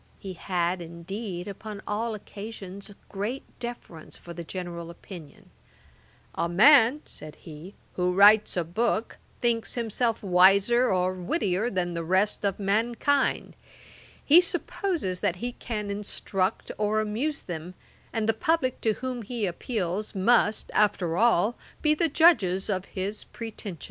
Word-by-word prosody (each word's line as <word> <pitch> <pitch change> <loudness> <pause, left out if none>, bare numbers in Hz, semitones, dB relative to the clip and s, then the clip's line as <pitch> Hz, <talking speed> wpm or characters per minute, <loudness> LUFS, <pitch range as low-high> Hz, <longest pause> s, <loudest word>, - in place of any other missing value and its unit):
He 190 -1 -7
had, 180 0 -1
indeed, 175 +3 -6
upon 205 +1 -8
all 220 +2 -2
occasions, 200 -1 -8
a 205 - -13
great 210 +7 -4 0.2
deference 235 -9 -8
for 170 - -10
the 170 - -7
general 170 -1 -6
opinion: 170 -3 -12 0.8
'A 170 - -1
man 255 - +6
(said 155 -1 -11
he) 160 +4 -11 0.2
who 180 0 0
writes 205 +2 +6
a 175 - +2
book, 220 +6 -1 0.2
thinks 235 -2 0
himself 230 -1 -1
wiser 200 +6 +5
or 185 0 +1
wittier 185 - -1
than 180 -4 -2
the 170 0 -3
rest 190 +6 +1
of 200 -1 0
mankind; 230 +7 +1 0.7
he 325 +5 +8
supposes 350 - -2
that 175 - 0
he 240 +7 -4
can 210 -4 -5
instruct 200 -1 -2
or 215 +1 +1
amuse 230 +8 -2
them, 175 +1 -7 0.4
and 220 -1 -1
the 225 - +3
publick 260 +2 0
to 220 - +2
whom 255 +1 -5
he 230 0 -3
appeals, 195 +1 -3
must, 215 +2 +2
after 185 -5 +2
all, 225 +1 +3 0.3
be 305 -1 +4
the 325 +2 +1
judges 215 - +4
of 185 -1 -2
his 200 +3 -4
pretensions.' 215 -5 -7
205 Hz, 140 wpm, -27 LUFS, 180-235 Hz, 0.8 s, he